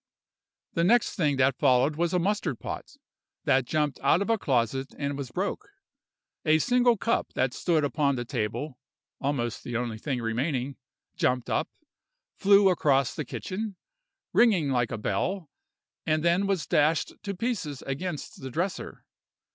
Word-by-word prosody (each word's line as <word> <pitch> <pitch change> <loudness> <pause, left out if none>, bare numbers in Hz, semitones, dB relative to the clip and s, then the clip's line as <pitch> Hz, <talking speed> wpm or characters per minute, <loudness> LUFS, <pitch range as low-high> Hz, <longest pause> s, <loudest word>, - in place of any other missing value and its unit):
"The 170 - +1
next 230 +6 +4
thing 150 -6 +1
that 130 0 +2
followed 130 +4 +4
was 170 +1 0
a 180 - +2
mustard 180 - 0
pot, - - -6 0.5
that 130 -1 +3
jumped 150 -1 0
out 140 +5 +3
of 225 - -1
a 225 - +3
closet 130 - 0
and 140 -1 -2
was 140 -3 -5
broke. 190 - -3 0.7
A 155 -1 +4
single 245 +5 +3
cup 230 +4 0
that 130 -1 0
stood 165 -4 +1
upon 145 -1 +1
the 120 -1 -3
table 125 +4 -3 0.4
(almost 130 -5 -2
the 120 -1 -3
only 120 -2 -3
thing 130 0 -2
remaining) 125 +3 -2 0.4
jumped 125 -1 0
up, - - 0 0.7
flew 200 0 +5
across 140 -7 +2
the 155 - -4
kitchen, 200 - -5 0.6
ringing 190 - +4
like 125 -2 +1
a 115 - -2
bell, 145 - -2 0.6
and 155 0 +2
then 175 +3 +3
was 190 -7 0
dashed 155 +2 +2
to 200 -1 -4
pieces 180 - -3
against 150 +3 -5
the 130 - -5
dresser. 180 +8 -4
150 Hz, 155 wpm, -27 LUFS, 130-185 Hz, 0.7 s, flew